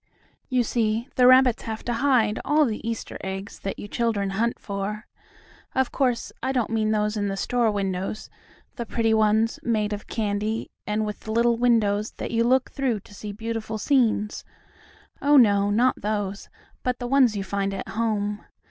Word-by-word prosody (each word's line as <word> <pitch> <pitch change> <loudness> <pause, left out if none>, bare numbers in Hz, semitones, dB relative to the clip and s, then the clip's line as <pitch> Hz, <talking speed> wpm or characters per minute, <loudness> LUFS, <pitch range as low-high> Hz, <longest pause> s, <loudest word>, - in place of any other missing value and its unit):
You 255 -2 +2
see, 230 +1 0
the 250 -1 +5
rabbits 255 -2 +6
have 220 -1 -6
to 240 - -1
hide 230 -4 +2
all 300 +2 +3
the 220 -4 -3
Easter 230 - -5
eggs 190 +1 -5
that 195 - -4
you - - -7
children 205 -3 -1
hunt 230 +4 0
for. 200 +2 -4 0.7
Of 265 -1 +1
course, 250 -4 0
I 260 - 0
don't 245 -4 0
mean 220 -1 +1
those 210 0 +1
in 205 -1 -1
the 195 0 -3
store 240 +1 +1
windows; 195 0 -3 0.5
the 235 - -3
pretty 225 -1 +1
ones, 220 +1 +2
made 215 -3 0
of 205 - -7
candy, 215 0 -2 0.2
and 210 +1 0
with 210 +1 -7
little 235 +2 +2
windows 220 -3 +2
that - - -6
you 230 0 +2
look 255 +2 +2
through 255 -7 -1
to 205 - -17
see 205 +1 -7
beautiful 225 +1 -4
scenes. 220 -4 +1 0.8
Oh, 290 +1 +5
no, 205 -5 +5
not 240 +5 +2
those, 205 -1 -3 0.3
but 250 -1 -1
the 245 - -5
ones 250 -4 +3
you 195 - -2
find 195 0 -2
at 195 - -5
home. 210 -2 -1
220 Hz, 175 wpm, -25 LUFS, 205-240 Hz, 0.8 s, rabbits